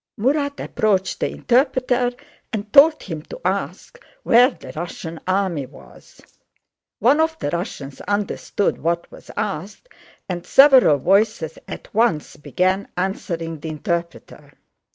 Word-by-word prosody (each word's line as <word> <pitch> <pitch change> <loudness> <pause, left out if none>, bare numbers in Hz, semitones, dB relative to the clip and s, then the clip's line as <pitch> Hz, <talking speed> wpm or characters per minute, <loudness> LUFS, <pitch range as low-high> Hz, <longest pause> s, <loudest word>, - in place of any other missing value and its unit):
Murat 285 +5 0
approached 195 -3 0
the - - 0
interpreter 255 -1 +1 0.4
and 210 -2 -5
told 305 +3 +7
him 160 -5 -6
to 330 - -10
ask - - -3 0.2
where 245 +2 +6
the 265 - -11
Russian 165 0 -6
army 185 -7 0
was. 135 - -17 0.8
One 265 +8 +3
of 320 0 +1
the 145 - -3
Russians 165 - -5
understood 205 0 -1
what 170 +1 -2
was - - -15
asked 200 - -4 0.4
and 175 -3 -4
several 265 - +6
voices 195 -1 +1
at - - -9
once 220 -8 +1
began 185 +7 -1
answering 170 -3 -3
the 160 - -6
interpreter. 170 +2 -5
195 Hz, 125 wpm, -21 LUFS, 165-245 Hz, 0.8 s, told